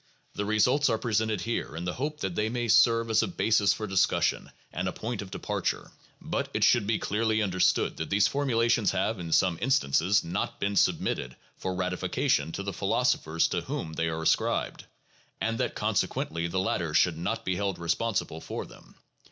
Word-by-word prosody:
The 105 - -3
results 125 +7 +3
are 115 - +1
presented 110 -3 0
here 115 -9 -3
in 85 +2 -5
the 90 - -2
hope 150 +3 -4
that 95 - -2
they 105 +4 0
may 120 0 -2
serve 115 +1 +4
as 110 - +4
a - - 0
basis 110 - +2
for 110 +3 -3
discussion 95 -2 +1 0.2
and 90 +2 -2
a - - -1
point 115 +2 -4
of 100 - -8
depar - - -4
ture. - - -2 0.3
But - - -3
it - - +1
should 100 - +4
be 110 - +2
clearly 110 +1 0
understood 95 -2 +1
that 80 - -4
these 100 +1 +4
formulations 115 -5 +1
have 110 -3 -1
in 85 -2 -6
some 90 0 +3
instances 105 - +2
not 90 +4 -3
been 100 0 -1
submitted 65 -8 +1 0.2
for 95 0 -4
ratification 90 -4 0
to 100 - -4
the 100 0 -4
philosophers 100 - +1
to - - -1
whom 80 - -5
they 80 +1 -1
are 80 0 -3
ascribed, - - 0 0.5
and 115 0 -1
that - - -1
consequently 85 +1 -1
the 95 +2 -1
latter 85 -4 -1
should 85 -3 +3
not 115 +6 -3
be 95 - 0
held 100 -1 -2
responsible 85 0 -1
for - - -5
them. - - -17
100 Hz, 190 wpm, -28 LUFS, 90-115 Hz, 0.5 s, serve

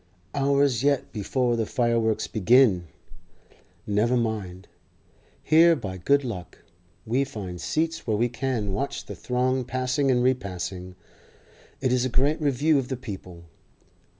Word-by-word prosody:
Hours 140 -3 +2
yet 140 -1 +1
before 120 +3 0
the 115 -2 -1
fireworks 115 -4 +1
begin. 110 -4 +3 1.0
Never 110 +4 +1
mind; 105 -6 -3 0.8
here 165 +2 +6
by 100 -9 -6
good 140 +10 +2
luck 100 -9 -6 0.5
we 125 +5 +1
find 100 -10 -7
seats 160 -1 -2
where 110 -2 +1
we 120 +3 +2
can 120 -4 -2
watch 140 +8 -3
the - - -7
throng 130 +1 0
passing 130 +3 -1
and 125 -1 +3
repassing. 95 -7 -2 0.9
It 130 -2 +1
is 125 -1 +2
a 130 - 0
great 140 +6 +1
review 145 +1 +2
of 130 - -4
the 130 - -3
People. 95 -8 -9
125 Hz, 135 wpm, -25 LUFS, 105-135 Hz, 1.0 s, here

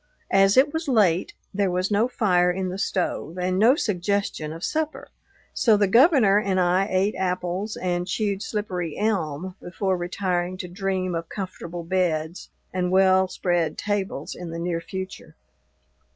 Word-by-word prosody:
As 195 +3 +4
it 285 +3 +5
was 320 0 -3
late, 200 -9 +2 0.2
there 200 -1 +1
was 185 +2 -1
no 210 +4 +3
fire 180 -8 +2
in 185 +1 -1
the 185 +2 -5
stove 180 -4 -2
and 185 +1 0
no 235 +6 +6
suggestion 200 - -1
of 165 +1 -8
supper, 315 0 -2 0.4
so 225 -5 +4
the 205 - +3
Governor 230 - +5
and 195 -3 0
I 180 +2 +2
ate 190 +3 +1
apples 185 +2 -2
and 175 -1 -2
chewed 200 -2 -1
slippery 185 -7 -3
elm 185 -5 -1
before 190 +2 -1
retiring 180 0 -2
to 185 -2 -5
dream 185 0 -2
of 165 0 -4
comfortable 175 -3 -6
beds 170 -2 -1 0.2
and 180 -1 0
well 190 0 +4
spread 175 -4 -1
tables 195 -8 -3
in 175 -1 -7
the 165 - -5
near 170 0 -2
future. 190 +3 -7
185 Hz, 155 wpm, -24 LUFS, 175-205 Hz, 0.4 s, no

